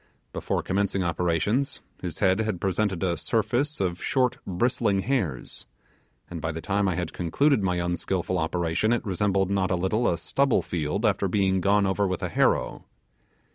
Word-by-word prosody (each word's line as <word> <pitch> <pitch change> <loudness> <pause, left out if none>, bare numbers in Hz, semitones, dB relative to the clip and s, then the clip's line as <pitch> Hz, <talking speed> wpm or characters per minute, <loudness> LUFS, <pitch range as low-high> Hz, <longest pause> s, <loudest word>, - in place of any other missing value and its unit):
Before - - -2
commencing 100 0 0
operations, 90 - 0 0.2
his 85 -3 -5
head 95 +4 +2
had 110 -5 -1
presented 95 -1 0
a 90 -2 +1
surface 120 - 0
of 90 -2 -1
short 130 -2 +1
bristling 100 0 +1
hairs, 95 - -2 0.6
and 85 -2 -7
by 80 - -2
the 80 - -5
time 100 +3 0
I 90 - 0
had 90 -2 -3
concluded 125 - +2
my 90 -2 0
unskilful 90 +1 -1
operation 85 +6 0
it 120 - -1
resembled 95 -1 +1
not 95 -2 +1
a 90 - +1
little 95 +7 +1
a 85 - 0
stubble 140 +7 +1
field 85 +6 -2
after 100 -2 +2
being 95 -1 +1
gone 100 +2 +3
over 95 +1 +1
with 95 -1 -3
a - - -1
harrow. - - +1
95 Hz, 170 wpm, -26 LUFS, 90-105 Hz, 0.6 s, gone